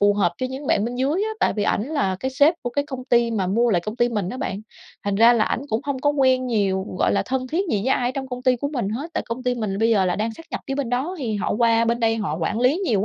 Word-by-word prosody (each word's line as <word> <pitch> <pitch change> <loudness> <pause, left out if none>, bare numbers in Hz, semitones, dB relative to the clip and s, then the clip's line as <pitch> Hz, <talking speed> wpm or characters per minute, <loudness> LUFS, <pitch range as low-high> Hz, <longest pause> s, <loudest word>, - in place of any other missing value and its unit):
phù 205 0 +4
hợp 205 - +2
cho 255 - -1
những 270 +2 -6
bạn 205 - +2
bên 240 +2 -3
dưới 280 +9 0
á, 440 - -2
tại - - +3
vì 210 - -2
ảnh 205 - +1
là 275 -12 0
cái 260 - -2
sếp 285 +5 +4
của 245 - -3
cái 285 +4 -1
công 260 -3 -6
ty 235 -2 +3
mà 200 -5 -1
mua 230 +5 +2
lại 180 -5 +2
công 215 +6 -6
ty 240 - +2
mình 210 -6 -2
á 255 - -5
bạn. 200 -5 -3 0.4
Thành 200 -1 0
ra 230 +3 +6
là 225 -3 +3
ảnh - - -1
cũng 220 -2 0
hông 280 -2 -2
có 290 +2 +2
quen 260 -3 +2
nhiều, 195 -4 0
gọi - - +2
là, - - +2
thân 255 0 -2
thiết 330 +7 0
gì - - +2
với 265 - +2
ai 245 - 0
ở - - -3
trong 265 -1 -4
công 250 0 -6
ty 255 -1 +3
của 285 +4 -3
mình 245 -9 -2
hết, 275 +11 -4
tại - - 0
công 235 +2 -4
ty 250 -1 0
mình 215 -5 -3
là 195 - -3
bây 225 +1 +3
giờ 205 -4 +3
là 180 -1 0
đang 220 +2 -1
sát 330 - -13
nhập - - -4
phía 270 - -2
bên 270 -4 -2
đó 265 +9 -1
thì 235 -7 -2
họ 200 - -1
qua 230 -1 +4
bên 235 +1 0
đây 225 -1 +2
họ 195 -9 -2
quản 210 +7 -1
lý 255 +5 +3
nhiều 235 - 0
240 Hz, 330 wpm, -22 LUFS, 215-265 Hz, 0.4 s, ra